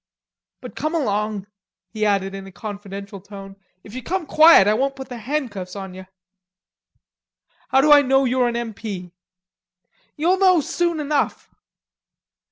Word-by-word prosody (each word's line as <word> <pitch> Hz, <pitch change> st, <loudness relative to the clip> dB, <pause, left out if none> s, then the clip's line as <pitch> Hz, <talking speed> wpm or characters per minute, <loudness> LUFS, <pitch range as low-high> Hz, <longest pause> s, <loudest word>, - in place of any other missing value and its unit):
But -, -, -10 dB
come 310 Hz, +2 st, -2 dB
along," 210 Hz, -7 st, -1 dB, 0.5 s
he 215 Hz, -1 st, -1 dB
added 195 Hz, -1 st, 0 dB
in 195 Hz, 0 st, -8 dB
a -, -, -11 dB
confidential 200 Hz, 0 st, -8 dB
tone. 195 Hz, 0 st, -11 dB, 0.3 s
"If 205 Hz, -, -13 dB
you 255 Hz, -, -5 dB
come 355 Hz, +7 st, -3 dB
quiet 310 Hz, -10 st, +7 dB
I 210 Hz, -, +4 dB
won't 270 Hz, +4 st, 0 dB
put 265 Hz, -1 st, -9 dB
the 245 Hz, -2 st, -7 dB
handcuffs 215 Hz, -8 st, -4 dB
on 190 Hz, -2 st, -7 dB
ye." 185 Hz, 0 st, -10 dB, 1.6 s
"How 265 Hz, -, +3 dB
do 300 Hz, +2 st, +4 dB
I 290 Hz, -1 st, +9 dB
know 270 Hz, 0 st, +2 dB
you're 250 Hz, 0 st, +2 dB
an 235 Hz, -, -2 dB
M. 235 Hz, -2 st, -4 dB
P.?" 195 Hz, -4 st, -7 dB, 1.1 s
"You'll 350 Hz, +5 st, +2 dB
know 370 Hz, -3 st, +5 dB
soon 340 Hz, +2 st, -1 dB
enough." 295 Hz, -1 st, -2 dB
230 Hz, 155 wpm, -21 LUFS, 200-290 Hz, 1.6 s, I